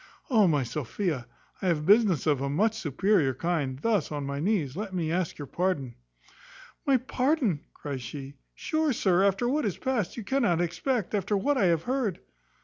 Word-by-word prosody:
O, 215 Hz, -5 st, +5 dB
my 145 Hz, -5 st, +2 dB
Sophia! 135 Hz, -, -3 dB, 0.3 s
I 190 Hz, -, -1 dB
have 155 Hz, -4 st, +1 dB
business 200 Hz, -, +4 dB
of 145 Hz, -4 st, +2 dB
a 140 Hz, -, -1 dB
much 210 Hz, +10 st, +2 dB
superior 155 Hz, -2 st, +1 dB
kind. 150 Hz, -6 st, -1 dB
Thus, 200 Hz, +1 st, 0 dB
on 145 Hz, -2 st, -3 dB
my 140 Hz, 0 st, -3 dB
knees, 160 Hz, -6 st, 0 dB
let 195 Hz, -1 st, -4 dB
me 165 Hz, -3 st, -1 dB
ask 175 Hz, -1 st, -1 dB
your 145 Hz, -, -6 dB
pardon." 150 Hz, -6 st, -1 dB, 0.9 s
"My 275 Hz, -2 st, +5 dB
pardon!" 255 Hz, -, 0 dB
cries 140 Hz, -3 st, -5 dB
she; 135 Hz, +2 st, -7 dB, 0.2 s
"Sure, 315 Hz, -2 st, 0 dB
sir, 190 Hz, -4 st, +2 dB
after 200 Hz, +4 st, +2 dB
what 295 Hz, +5 st, +1 dB
is 205 Hz, -6 st, -1 dB
past, 245 Hz, -9 st, -1 dB
you 230 Hz, -, -4 dB
cannot 210 Hz, -7 st, +1 dB
expect, 175 Hz, +7 st, -1 dB
after 205 Hz, 0 st, +1 dB
what 285 Hz, +9 st, +1 dB
I 240 Hz, -, +3 dB
have 165 Hz, -2 st, +2 dB
heard." 245 Hz, -7 st, -1 dB
185 Hz, 180 wpm, -28 LUFS, 150-220 Hz, 0.9 s, O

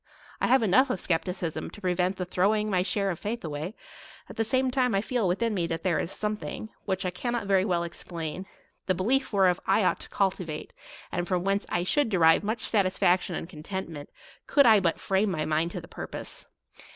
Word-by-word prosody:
I -, -, +3 dB
have 260 Hz, -1 st, +4 dB
enough 220 Hz, +7 st, +4 dB
of 190 Hz, -, -1 dB
skepticism 175 Hz, -1 st, -2 dB
to -, -, -12 dB
prevent 180 Hz, 0 st, 0 dB
the 180 Hz, -, -2 dB
throwing 210 Hz, +4 st, +1 dB
my 180 Hz, -2 st, +3 dB
share 200 Hz, 0 st, 0 dB
of 170 Hz, -, -5 dB
faith 230 Hz, +3 st, -4 dB
away: 155 Hz, +7 st, -4 dB, 0.5 s
at -, -, -9 dB
the 225 Hz, -, +1 dB
same 260 Hz, +3 st, +1 dB
time 250 Hz, -4 st, +2 dB
I 195 Hz, -, +2 dB
feel 230 Hz, -2 st, 0 dB
within 215 Hz, +6 st, 0 dB
me 175 Hz, -4 st, 0 dB
that 165 Hz, -1 st, -3 dB
there 185 Hz, -4 st, +2 dB
is 170 Hz, -, -2 dB
something, 215 Hz, +1 st, -3 dB, 0.2 s
which 190 Hz, -1 st, -1 dB
I 180 Hz, -, 0 dB
cannot 240 Hz, +3 st, -2 dB
very 195 Hz, -1 st, +3 dB
well 175 Hz, -3 st, +1 dB
explain, 170 Hz, +1 st, -6 dB, 0.4 s
the 185 Hz, -, +2 dB
belief 260 Hz, +9 st, +1 dB
whereof 190 Hz, -4 st, +3 dB
I 195 Hz, +2 st, +4 dB
ought -, -, +2 dB
to -, -, -9 dB
cultivate, 180 Hz, -5 st, -2 dB, 0.4 s
and 175 Hz, 0 st, -2 dB
from 180 Hz, -1 st, 0 dB
whence 195 Hz, +1 st, 0 dB
I 175 Hz, -, 0 dB
should 285 Hz, +7 st, +2 dB
derive 165 Hz, -4 st, +5 dB
much 220 Hz, +2 st, -2 dB
satisfaction 185 Hz, -3 st, +2 dB
and -, -, -4 dB
content 185 Hz, +2 st, -6 dB
merit, 145 Hz, -3 st, -8 dB, 0.4 s
could 280 Hz, -1 st, +5 dB
I 220 Hz, -3 st, +7 dB
but 170 Hz, -4 st, 0 dB
frame 195 Hz, +2 st, +1 dB
my 155 Hz, -4 st, -1 dB
mind 155 Hz, +2 st, +1 dB
to -, -, -4 dB
the -, -, -12 dB
pur -, -, -7 dB
pose. -, -, -6 dB
190 Hz, 210 wpm, -27 LUFS, 175-215 Hz, 0.5 s, I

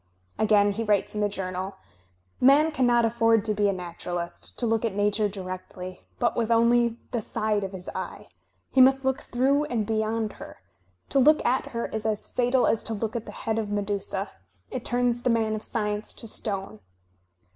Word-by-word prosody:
Again 205 Hz, -1 st, +4 dB
he 220 Hz, +3 st, -2 dB
writes 210 Hz, -2 st, +1 dB
in 210 Hz, -, -2 dB
the 205 Hz, -, +2 dB
Journal: 190 Hz, 0 st, -4 dB, 0.7 s
''Man 290 Hz, +5 st, +5 dB
cannot 245 Hz, -4 st, +3 dB
afford 225 Hz, -1 st, +3 dB
to 215 Hz, -, +2 dB
be 205 Hz, 0 st, +2 dB
a -, -, +3 dB
naturalist, 175 Hz, -1 st, -5 dB
to 245 Hz, -, 0 dB
look 225 Hz, -1 st, +1 dB
at 225 Hz, -4 st, -1 dB
Nature 205 Hz, +1 st, +2 dB
directly, 185 Hz, -1 st, -7 dB, 0.2 s
but 240 Hz, -, +1 dB
with 230 Hz, -1 st, 0 dB
only 235 Hz, 0 st, +3 dB
the 240 Hz, -3 st, -1 dB
side 215 Hz, -1 st, -1 dB
of 190 Hz, -, -4 dB
his 185 Hz, -2 st, -8 dB
eye. -, -, -6 dB, 0.4 s
He 260 Hz, -, +5 dB
must 270 Hz, +1 st, +5 dB
look 265 Hz, 0 st, +1 dB
through 275 Hz, +4 st, +1 dB
and 230 Hz, -6 st, -1 dB
beyond 220 Hz, 0 st, -1 dB
her. -, -, -9 dB, 0.5 s
To 275 Hz, -, +3 dB
look 305 Hz, +4 st, +5 dB
at 255 Hz, +2 st, +1 dB
her 235 Hz, -1 st, -3 dB
is 220 Hz, 0 st, -3 dB
as 215 Hz, -2 st, -1 dB
fatal 250 Hz, +1 st, +2 dB
as 225 Hz, -, +2 dB
to 225 Hz, -, -2 dB
look 220 Hz, +2 st, -3 dB
at 230 Hz, -, -4 dB
the -, -, -6 dB
head 220 Hz, 0 st, +1 dB
of 215 Hz, -2 st, -3 dB
Medusa. 200 Hz, -1 st, -2 dB, 0.4 s
It 250 Hz, -, -4 dB
turns 245 Hz, 0 st, +1 dB
the 250 Hz, -, +1 dB
man 225 Hz, -2 st, +2 dB
of 215 Hz, -, -3 dB
sdence 210 Hz, -1 st, -3 dB
to 230 Hz, -, -6 dB
stone." 195 Hz, -, -3 dB
220 Hz, 190 wpm, -26 LUFS, 205-240 Hz, 0.7 s, Man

